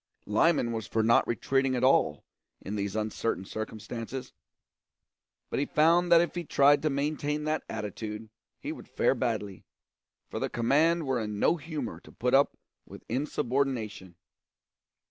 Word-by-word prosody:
Lyman 120 +3 +2
was 110 -2 -4
for 110 - 0
not 115 +1 +4
retreating 135 +2 +1
at 125 - -1
all, 130 - +3 0.4
in 105 - -6
these 100 0 -3
uncertain 110 -2 -2
circumstances; 110 +4 -6 1.2
but - - 0
he 140 - +1
found 170 +3 +3
that 170 - +9
if 175 - 0
he 175 - -3
tried 145 -2 +4
to 155 - +1
maintain 150 +1 -1
that 155 +1 0
attitude 105 +1 -5 0.3
he - - -5
would - - -9
fare - - +2
badly, 100 -3 -3 0.6
for - - -5
the - - -1
command 155 +8 +2
were 130 -2 0
in 105 -2 -4
no 170 - +3
humour 150 -6 -5
to - - -16
put 125 +3 -1
up 140 +1 +4 0.3
with - - -12
insubordination. 120 - -2
130 Hz, 150 wpm, -29 LUFS, 110-150 Hz, 1.2 s, that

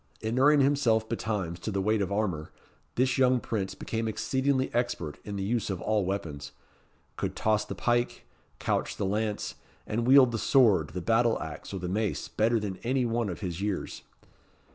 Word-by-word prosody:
Inuring 135 +6 +4
himself 125 -6 +2
betimes 100 -7 -3
to 110 - -4
the 100 -2 -1
weight 105 +2 +1
of 100 0 -1
armour, 95 -7 -1 0.4
this 130 +1 +2
young 130 -1 +4
prince 100 -5 -3
became 115 0 -3
exceedingly 130 +4 0
expert 120 -11 -2
in 105 - -6
the 100 - -2
use 115 +3 -1
of 95 -3 -2
all 105 -1 0
weapons 80 -7 -4 0.6
could - - -3
toss 110 -1 +1
the - - -6
pike, 120 0 0 0.3
couch - - -1
the - - -1
lance, 105 +2 -1 0.3
and 115 +2 -1
wield 130 -2 +7
the 115 - -2
sword, 105 - +4
the 90 - -3
battle 115 +4 +2
axe, 80 -2 -7
or 100 - -4
the 90 -1 -4
mace, 105 +3 -1
better 115 +2 +1
than 100 -3 -4
any 125 +4 0
one 115 -2 0
of 90 - -6
his 90 -2 -4
years. 105 -2 -3
110 Hz, 180 wpm, -28 LUFS, 95-120 Hz, 0.6 s, wield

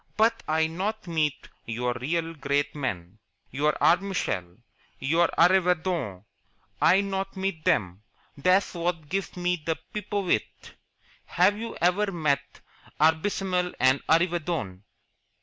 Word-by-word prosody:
"But 225 +2 +3
I 160 +1 +2
not 195 +7 -3
meet 155 -4 -1 0.2
your 120 +2 -1
real 165 +7 -2
great 145 -1 -1
men 100 - -4 0.3
your 150 +3 +1
Arbmishel, 170 - 0 0.4
your 165 +5 +2
Arreevadon 175 - +2 0.6
I 185 +4 +5
not 195 0 -3
meet 190 -4 -3
them. 95 -1 +1 0.3
That's 185 +7 +2
what 170 -3 -3
gives 195 -2 -3
me 180 -1 0
the 160 0 -1 0.2
pipovitch. 205 - -2 0.5
Have 185 +4 +3
you 230 +2 -6
ever 195 +4 +2
met 145 -5 -1 0.4
Arbmishel 180 +3 +1
and 130 +1 +4
Arreevadon?" 165 - 0
165 Hz, 115 wpm, -26 LUFS, 140-185 Hz, 0.6 s, I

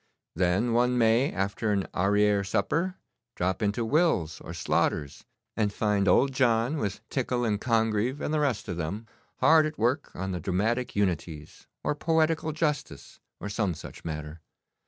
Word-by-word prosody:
Then 95 +7 +1
one 125 +1 +2
may, 115 +3 +3
after 100 +3 -1
an 100 -2 0
arriere 100 +1 +2
supper, 170 - 0 0.4
drop 95 +4 -1
into 105 +3 0
Will's 145 - +1
or - - -8
Slaughter's 75 -2 -1 0.3
and 105 -2 +1
find 105 -1 0
Old 135 +9 +4
John, 120 +2 +2
with 105 -1 -4
Tickell 125 -2 -1
and 105 -2 0
Congreve 115 +2 +1
and 150 - -2
the 155 - +2
rest 135 -8 0
of 90 -4 -4
them, 95 +7 -4 0.4
hard 160 -1 +6
at 155 - -7
work 125 +6 0
on 95 +1 -3
the 90 - -3
dramatic 110 +8 -1
unities, 85 -6 -3 0.2
or - - +1
poetical 160 +1 +1
justice, 150 -2 -3 0.2
or - - -5
some 100 -4 -1
such - - -10
matter. 75 0 -6
110 Hz, 155 wpm, -27 LUFS, 95-130 Hz, 0.4 s, hard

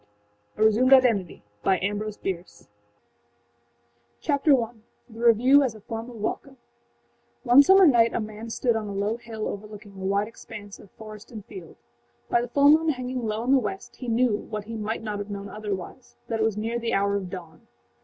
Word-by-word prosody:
7354A 220 - +3
Resumed 235 +5 +3
IdentityAmbrose 200 - +1
Bierce 170 - -6 1.5
Chapter 280 - +3
I: 225 - -7 0.4
The 225 -2 -13
Review 240 +4 +5
As 255 -5 -1
a 215 - -13
Form 225 +3 -6
of 245 - -11
Welcome[edit] 225 +5 -4 0.9
One 250 +2 +7
summer 380 +6 +6
night 235 -6 +5
a - - +1
man 215 +1 -7
stood 235 +1 0
on 220 -1 -3
a 200 - -5
low 205 +3 -1
hill 225 -2 -6
overlooking 210 +1 -8
a 190 -1 -10
wide 200 +2 +1
expanse 205 -2 -11
of 200 - -15
forest 215 0 -11
and 215 -4 -9
field. 175 -4 -11 0.6
By 240 - +3
the 240 - -4
full 285 +3 +5
moon 320 +1 +4
hanging 255 -3 -3
low 215 +1 -2
in 255 - 0
the 275 - +6
west 195 -5 -6
he 250 - -8
knew 235 -1 +2
what 210 0 -6
he 225 +2 -7
might 220 +1 -4
not 210 -2 -4
have 205 +1 -6
known 200 0 -6
otherwise: 210 +3 -7
that 225 -1 -1
it - - +2
was 220 -2 0
near 225 +2 -2
the 235 0 -1
hour 200 0 +1
of 190 -3 -3
dawn. 170 -4 -10
220 Hz, 190 wpm, -25 LUFS, 205-240 Hz, 1.5 s, One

